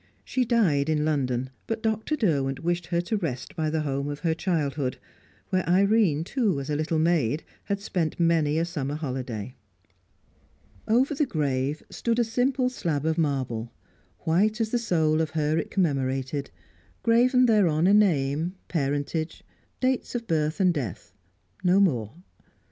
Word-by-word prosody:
She 255 -1 0
died 175 - +2
in 150 -1 +1
London, 130 -4 -1 0.2
but 225 0 -3
Dr. 220 +6 0
Derwent 145 - 0
wished 175 0 -1
her 170 -1 +1
to 210 +5 -1
rest 145 -10 -4
by 160 -2 0
the 160 0 0
home 140 -1 -2
of 145 0 -5
her 165 -2 +1
childhood, 150 -7 -1 0.5
where 185 -1 +1
Irene, 195 -4 +3
too, 205 - 0
as 140 +2 -4
a - - +1
little 155 +2 0
maid, 155 -4 +1 0.2
had 200 -1 -1
spent 180 -6 -2
many 165 -3 +2
a 165 - +2
summer 150 -5 -3
holiday. 125 -6 -4 1.3
Over 250 +6 +3
the 290 0 0
grave 145 - -1
stood 235 -1 -1
a 240 - +4
simple 250 +3 +1
slab 165 - -2
of 160 +1 +1
marble, 130 -7 -1 0.5
white 205 +7 +2
as 220 -1 0
the 240 - +1
soul 160 -8 +2
of 160 - -1
her 155 +1 +1
it - - -4
commemorated, 135 -5 -1 0.5
graven 250 +2 +4
thereon 180 -9 +3
a 195 - +5
name, 165 -4 +2
parentage, 145 +1 -2 0.4
dates 255 -1 0
of 235 -1 -2
birth 155 -2 0
and 185 -2 +4
death 115 - -5 0.5
no 180 +1 +4
more. 125 - +1
160 Hz, 155 wpm, -26 LUFS, 145-205 Hz, 1.3 s, a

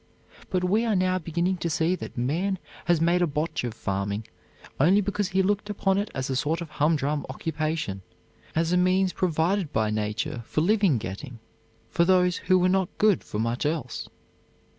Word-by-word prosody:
But 185 -1 0
we 205 +5 +2
are 225 -3 +1
now 185 0 +2
beginning 175 +3 -1
to 170 - -2
see 160 +3 +1
that 185 - -6
man 170 +11 0 0.3
has 175 -2 +3
made 170 +2 +3
a 175 - +3
botch 150 +1 -2
of 120 -2 -4
farming 100 +2 -2 0.5
only 180 +9 +5
because 205 0 -1
he 190 0 +1
looked 205 +2 0
upon 195 -1 +1
it 205 - -2
as 130 -1 -2
a 135 - -2
sort 155 +5 0
of 170 -3 -7
humdrum 150 -1 +1
occupation; 155 -8 -3 0.5
as 165 +2 +1
a - - +4
means 185 0 +3
provided 175 0 0
by 110 -1 +1
nature 105 +2 -2
for 155 - 0
living 195 - +3
getting 115 +5 -6 0.5
for 170 - +2
those 180 0 +3
who 185 +1 +3
were 180 0 +3
not 190 -1 +2
good 210 -3 +3
for - - -6
much 115 +2 -1
else. 145 -5 -3
170 Hz, 185 wpm, -26 LUFS, 140-185 Hz, 0.5 s, only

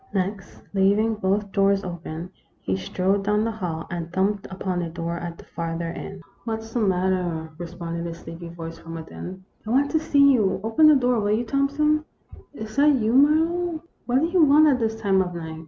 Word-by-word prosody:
Next, 195 +1 -3
leaving 205 +3 +3
both 200 -1 -1
doors 195 0 +2
open, 175 -1 -6 0.3
he 95 - -2
strode 190 - 0
down 210 +1 +1
the 230 - -1
hall, 175 -7 -4
and 170 -1 -4
thumped 195 +2 0
upon 185 -1 -3
a 170 - -3
door 170 +1 -4
at 170 -1 -6
the - - -14
farther 165 0 -4
end. 185 +2 -8
" - - -35
What 225 -1 -3
's 225 0 -13
the 245 - 0
matter? 180 -5 0
" - - -22
responded 170 0 -5
a 170 - -4
sleepy 170 0 -9
voice 165 -1 -8
from 165 0 -9
within. 180 +3 -8
" - - -21
I - - -4
want 275 +4 +2
to 315 - +2
see 280 -2 +5
you. 205 -7 +1
Open 225 +8 +4
the 305 - +7
door, 250 -3 +2
will 205 -1 0
you, 235 +3 0
Thompson? 285 +4 +1
" - - -20
" - - -36
Is 220 +1 -8
that 295 +1 +6
you, 225 -2 0
Marlowe? 320 +4 +3 0.2
What 255 +2 +2
do - - +3
you 345 0 +3
want 300 +1 +6
at 260 -3 +2
this 225 -1 -1
time 195 -3 +3
of 180 -1 -3
night 160 -1 -6
195 Hz, 220 wpm, -24 LUFS, 170-245 Hz, 0.3 s, the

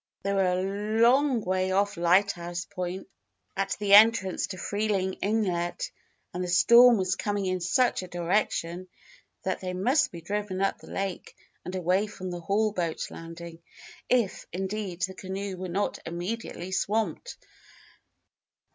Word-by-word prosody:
They 200 +1 0
were 195 -1 +2
a 200 +4 -2
long 255 +1 +4
way 185 -1 0
off 200 +2 +1
Lighthouse 175 0 +1
Point, 180 +1 -5 0.5
at 195 0 -1
the 200 -1 +1
entrance 210 -3 +6
to 185 - -7
Freeling 205 -1 -1
Inlet, 190 -5 -1 0.4
and 180 - -3
the - - -3
storm 235 +7 +7
was 185 -2 0
coming 205 -2 -2
in 185 -1 -1
such 235 +8 +2
a 185 - -7
direction 175 0 -1 0.6
that 190 - -1
they 185 -1 -4
must 245 +11 +2
be 170 - -8
driven 205 +1 -3
up 195 0 0
the - - -14
lake 195 -2 -4 0.3
and 180 +2 -6
away 185 +3 +1
from 185 -3 -7
the 175 - -5
Hall 210 +5 +1
boat 170 -5 -3
landing 165 0 -9 0.5
if, 240 -6 +1
indeed, 190 -1 -4
the 190 0 -1
canoe 190 +1 -5
were 185 0 -5
not 195 +4 -1
immediately 180 +2 -5
swamped. 220 - -1
190 Hz, 145 wpm, -27 LUFS, 180-205 Hz, 0.6 s, storm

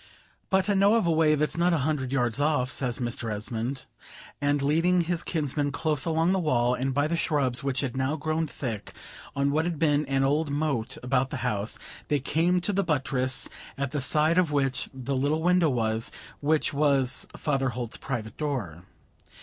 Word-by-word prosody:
"But 190 -1 +2
I 205 - +3
know 200 +3 +4
of 230 - +2
a 170 - +2
way 155 -1 +4
that's 150 +2 -1
not 175 0 +3
a 140 -4 0
hundred 140 -5 -1
yards 125 -1 0
off," 145 -4 +1
says 125 -3 0
Mr. 120 -2 -2
Esmond; 115 +5 -3 0.6
and 145 0 +2
leading 165 +5 +3
his 170 0 -1
kinsman 145 -3 -1
close 150 -1 -1
along 165 +1 +2
the 190 - +2
wall, 125 -7 +2
and 130 +2 -1
by 145 +2 +1
the 165 +2 0
shrubs 140 -7 0
which 135 -1 -1
had 135 -3 -3
now 130 +3 0
grown 155 +1 -1
thick 115 -5 -5 0.4
on 140 0 +1
what 155 +3 +1
had 175 -2 -2
been 150 -2 +2
an 135 0 +1
old 145 +3 +1
moat 140 -5 -1
about 130 +1 +1
the - - -4
house, 105 +1 -1 0.3
they 145 - +1
came 165 +6 +1
to 205 - -1
the 200 +1 +1
buttress, 135 -5 +1 0.3
at 140 -2 -2
the 145 - -1
side 155 +5 +3
of 170 -4 +1
which 135 -3 0
the 135 +1 -4
little 145 +4 0
window 180 -2 +4
was, 115 -2 0 0.3
which 150 0 +1
was 140 -3 +2
Father 135 -3 0
Holt's 120 -1 -4
private 115 -5 -5
door. 120 - -3
145 Hz, 190 wpm, -27 LUFS, 130-160 Hz, 0.6 s, know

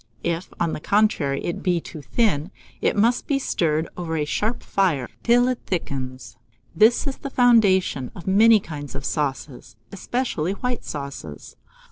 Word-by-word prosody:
If, 170 +2 -2
on 170 -2 0
the - - -4
contrary, 165 -8 +1
it 170 - -3
be 180 -2 +1
too 160 -1 -9
thin, 175 - 0 0.3
it - - +1
must 235 +4 +2
be 280 - +2
stirred 160 - 0
over 165 -2 -3
a 150 - 0
sharp 215 +9 -2
fire 165 -11 +1
till 245 +1 +4
it 255 -1 -1
thickens. 130 -7 -4 0.4
This 220 - +4
is 275 -2 -3
the 275 - -6
foundation 200 - +3
of 170 - -10
many 215 +3 +6
kinds 145 -6 -8
of 140 0 -5
sauces, 135 -6 -3 0.2
especially 200 -5 -2
white 250 +3 -3
sauces. 140 - -7
175 Hz, 155 wpm, -23 LUFS, 145-225 Hz, 0.4 s, many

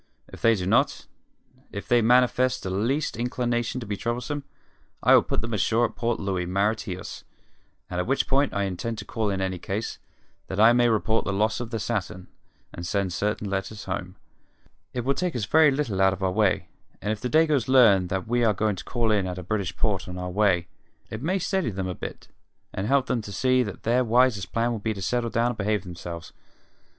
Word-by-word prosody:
If - - -12
they 115 0 +5
do 90 -3 -3
not 95 - +2 0.7
if 100 - -6
they 120 -1 +4
manifest 125 +2 +3
the 95 - -3
least 120 +10 0
inclination 120 0 -1
to - - -6
be 105 -1 -3
troublesome 125 +6 -3 0.6
I - - +6
will - - +8
put - - -2
them 115 +1 -5
ashore 115 +3 +2
at 110 -1 -5
Port 120 0 -1
Louis, 95 -3 -2
Mauritius, 100 0 -2 0.6
at 90 +2 -3
which 135 +2 +1
port 140 +1 +2
I 100 - -1
intend 100 +4 -3
to 105 - -7
call 110 -1 -2
in 95 -1 -1
any 95 -1 -2
case, 100 +5 -4 0.5
that 95 - -4
I 115 +2 +7
may 120 0 +4
report 110 0 +1
the - - -1
loss 110 +3 +1
of 120 -2 -5
the 115 - -3
Saturn, 100 -4 -3 0.4
and 85 - -7
send 95 +1 -1
certain 105 +2 -1
letters 100 +1 -4
home. 95 0 -5 0.8
It 125 -1 -4
will 140 - +3
take 175 +3 -2
us 115 -4 -1
very 155 +7 +5
little 135 -9 -1
out 95 0 +5
of 95 0 -6
our 95 - +2
way, 105 0 +1 0.3
and 105 - -2
if 110 - -3
the 125 - -2
Dagoes 155 -4 +3
learn 110 -8 +5
that 95 +1 -3
we 120 +1 +1
are 110 -3 +3
going 105 0 0
to - - -7
call 115 -2 0
in 100 -3 +1
at 90 0 -4
a 90 - -6
British 95 -1 -2
port 100 -6 0
on 90 0 -6
our 90 0 -4
way, 90 -3 +2 0.4
it 110 - -5
may 180 +7 0
steady 190 - 0
them 95 -2 -3
a 90 - -3
bit - - -8 0.5
and 95 - -3
help 135 +1 +3
them 125 -2 -1
to 105 - -9
see 130 +5 +2
that 100 -6 -5
their 120 +3 +2
wisest 120 -4 +2
plan 115 +1 +1
will 115 - -3
be 110 +1 -2
to 100 - -7
settle 120 +3 0
down 115 +2 +1
and 120 - -4
behave 105 -1 0
themselves. 85 -2 -8
110 Hz, 220 wpm, -25 LUFS, 95-120 Hz, 0.8 s, will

